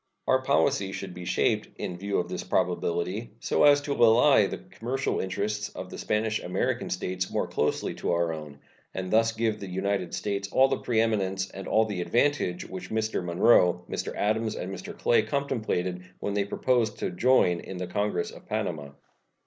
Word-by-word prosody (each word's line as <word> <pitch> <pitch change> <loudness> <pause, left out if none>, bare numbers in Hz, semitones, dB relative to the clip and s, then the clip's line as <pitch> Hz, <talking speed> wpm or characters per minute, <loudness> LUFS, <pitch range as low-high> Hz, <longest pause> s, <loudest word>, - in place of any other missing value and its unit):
Our 130 0 +4
policy 130 -6 +2
should 95 -2 -6
be 90 0 -8
shaped, 90 - +1
in 90 - -3
view 100 +1 -1
of 90 - 0
this - - -4
probability, 95 +7 -1
so - - +1
as 145 0 +6
to 145 0 -2
ally 120 -1 +5
the - - -5
commercial 130 +4 -3
interests 105 +2 -2
of - - -8
the - - -7
Spanish 110 0 0
American 90 - -1
States 90 0 -2
more - - 0
closely - - -1
to - - -2
our 85 -1 +1
own, 75 -2 -8 0.4
and 95 -1 -4
thus 115 +1 +4
give 110 -1 -1
the 100 - -7
United 95 -1 -1
States 100 -1 -2
all 135 +1 +5
the - - 0
preeminence 100 -5 0
and 95 -1 -8
all 110 +1 +3
the 105 -4 -3
advantage 120 -4 +1
which 95 -1 -7
Mr. 110 -3 -1
Monroe, 90 -1 +4
Mr. - - -4
Adams, 110 +1 0
and 95 +2 -5
Mr. 95 - -8
Clay 120 - +3
contemplated 110 -10 -2 0.2
when 100 - -2
they 100 -1 +1
proposed 115 +1 +1
to - - -2
join 90 -3 +3
in 95 - -7
the 90 - -3
congress 100 0 -1
of - - -14
Panama. 75 -2 -3
100 Hz, 180 wpm, -27 LUFS, 90-115 Hz, 0.4 s, as